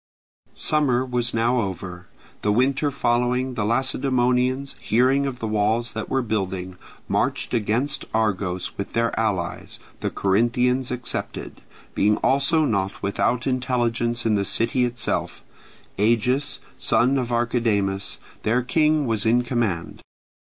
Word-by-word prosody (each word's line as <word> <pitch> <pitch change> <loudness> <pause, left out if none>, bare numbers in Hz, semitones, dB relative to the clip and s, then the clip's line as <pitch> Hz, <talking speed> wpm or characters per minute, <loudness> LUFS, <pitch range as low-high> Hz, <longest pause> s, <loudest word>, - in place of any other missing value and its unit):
Summer 135 -5 +1
was 120 -2 -1
now 120 +2 +2
over. 90 -2 -6 0.3
The 105 - +1
winter 135 +6 +2
following 125 -1 0
the 110 - -2
Lacedaemonians, 130 +2 +1
hearing 130 +5 +2
of 130 -2 -4
the 115 - -4
walls 110 +2 +1
that 110 -1 -5
were 135 -1 +1
building, 95 -4 -3 0.3
marched - - -1
against 120 +6 0
Argos 100 -5 -1
with 100 - -4
their 115 0 +1
allies, 95 -6 -2 0.2
the - - -1
Corinthians 120 +6 +1
excepted, 125 0 -5 0.3
being 105 +1 +3
also 145 +4 +2
not 100 -6 -1
without 115 +5 0
intelligence 120 -2 0
in 110 - +3
the 100 -1 +2
city 115 +5 +1
itself; 120 -2 -2 0.6
Agis, 120 +6 +1 0.2
son 135 +3 +3
of 125 -1 -3
Archidamus, 110 -5 0 0.2
their 120 +3 +1
king, 155 +3 +2
was 110 -3 0
in 120 +2 +4
command. 110 -9 -2
120 Hz, 125 wpm, -23 LUFS, 105-130 Hz, 0.6 s, in